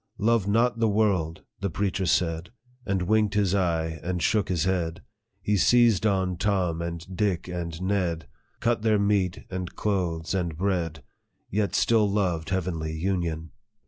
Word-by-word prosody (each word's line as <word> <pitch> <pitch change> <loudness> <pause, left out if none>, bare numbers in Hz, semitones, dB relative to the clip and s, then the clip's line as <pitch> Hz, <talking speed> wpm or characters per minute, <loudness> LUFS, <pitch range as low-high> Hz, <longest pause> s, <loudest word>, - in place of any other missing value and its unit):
' - - -41
Love 115 -4 +2
not 115 +3 +2
the 115 - +3
world,' 100 -7 +1 0.2
the 100 - -1
preacher 95 +1 -1
said, 80 +1 +1 0.4
And 95 -2 0
winked 105 +1 +2
his 100 -3 +2
eye, 80 -4 0
and 90 0 -2
shook 105 +3 +1
his 85 -4 +1
head; 90 -2 -1 0.4
He 105 0 +2
seized 115 -1 +4
on 95 -3 0
Tom, 90 -4 0
and 85 0 -4
Dick, 95 -4 0
and 85 -2 -4
Ned, 90 -5 -1 0.3
Cut 120 0 +2
short - - -17
their 110 -1 +3
meat, 100 -3 +1
and 90 -2 -5
clothes, 90 -6 -1
and 85 -5 -1
bread, 85 -6 -1 0.5
Yet 105 0 0
still 110 -3 +3
loved 90 -6 0
heavenly 85 -4 -2
union. 85 -2 -2
95 Hz, 160 wpm, -26 LUFS, 85-100 Hz, 0.5 s, seized